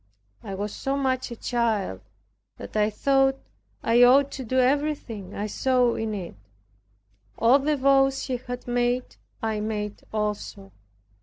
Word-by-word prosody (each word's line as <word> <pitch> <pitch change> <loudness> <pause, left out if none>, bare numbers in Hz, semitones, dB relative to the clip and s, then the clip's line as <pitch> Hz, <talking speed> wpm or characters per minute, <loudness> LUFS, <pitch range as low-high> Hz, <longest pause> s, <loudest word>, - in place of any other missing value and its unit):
I 195 - -6
was 205 +2 -4
so 270 +1 -2
much 260 -2 -1
a 235 - -6
child, 225 - -1 0.6
that - - -10
I 210 0 +3
thought 270 +4 +2 0.5
I 235 +1 +4
ought 270 +3 +6
to 265 - -6
do 255 +2 -2
everything 255 -7 0
I 205 - -2
saw 250 +2 +2
in 220 -1 -3
it. 180 -4 -6 1.0
All 245 +5 +5
the 295 +2 0
vows 270 0 +3
she 255 -2 -2
had 245 0 -7
made 245 +1 -1 0.3
I 220 -1 -1
made 210 -1 -4
also. 210 -2 -4
245 Hz, 145 wpm, -25 LUFS, 210-270 Hz, 1.0 s, ought